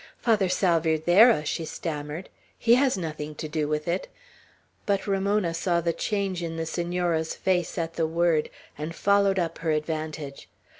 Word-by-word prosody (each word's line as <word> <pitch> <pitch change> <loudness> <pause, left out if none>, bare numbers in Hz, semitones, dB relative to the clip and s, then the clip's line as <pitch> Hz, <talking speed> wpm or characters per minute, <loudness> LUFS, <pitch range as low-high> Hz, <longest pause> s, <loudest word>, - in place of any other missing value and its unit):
"Father 215 -6 +2
Salvierderra?" 175 +2 +4
she 160 - -2
stammered; 155 +1 -5 0.3
"he 235 - +4
has 255 -2 +3
nothing 155 -3 -5
to 155 - -5
do 150 -1 -1
with 150 +1 -2
it." 175 +3 -1 0.8
But 200 -1 +1
Ramona 200 -2 +1
saw 170 +1 +1
the 170 0 0
change 195 -3 -2
in 165 -1 -4
the 165 - -2
Senora's 170 -1 -1
face, 180 -2 0
at 165 -1 -2
the 165 -1 0
word, 165 -1 +1 0.3
and 155 +2 -4
followed 200 0 +3
up 170 -3 -1
her 165 - -2
advantage. 155 -2 -3
170 Hz, 155 wpm, -26 LUFS, 155-190 Hz, 0.8 s, Salvierderra